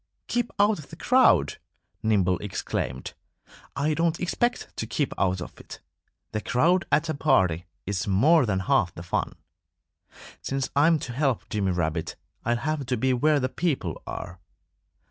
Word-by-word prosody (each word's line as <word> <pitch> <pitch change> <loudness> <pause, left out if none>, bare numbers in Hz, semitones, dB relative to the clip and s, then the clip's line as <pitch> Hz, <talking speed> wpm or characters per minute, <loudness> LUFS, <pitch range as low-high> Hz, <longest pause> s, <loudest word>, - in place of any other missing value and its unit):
"Keep 240 -1 -1
out 205 -1 +3
of 150 - -11
the 165 - -9
crowd!" 175 - +3 0.4
Nimble 95 -5 +2
exclaimed. 65 -9 -4 0.6
"I 150 +3 +1
don't 165 +1 0
expect 240 +7 -1
to 110 - -3
keep 130 +5 -1
out 95 -2 0
of - - -9
it. - - -10 0.5
The 110 - -2
crowd 165 - +2
at 155 +2 +3
a 160 - -1
party 95 - +2 0.2
is 95 0 -2
more 130 - +4
than 95 -2 0
half 105 -7 +1
the 85 - -7
fun. 90 - -2 1.1
Since 135 -1 -2
I'm 155 +3 +5
to 125 -4 -6
help 135 -2 0
Jimmy 100 -3 0
Rabbit 80 -2 -2 0.3
I'll 120 +1 +1
have 155 0 -2
to 125 -1 0
be 130 +3 +2
where 150 +4 +3
the 130 - 0
people 130 - -2
are." 90 0 -6
130 Hz, 160 wpm, -26 LUFS, 95-155 Hz, 1.1 s, I'm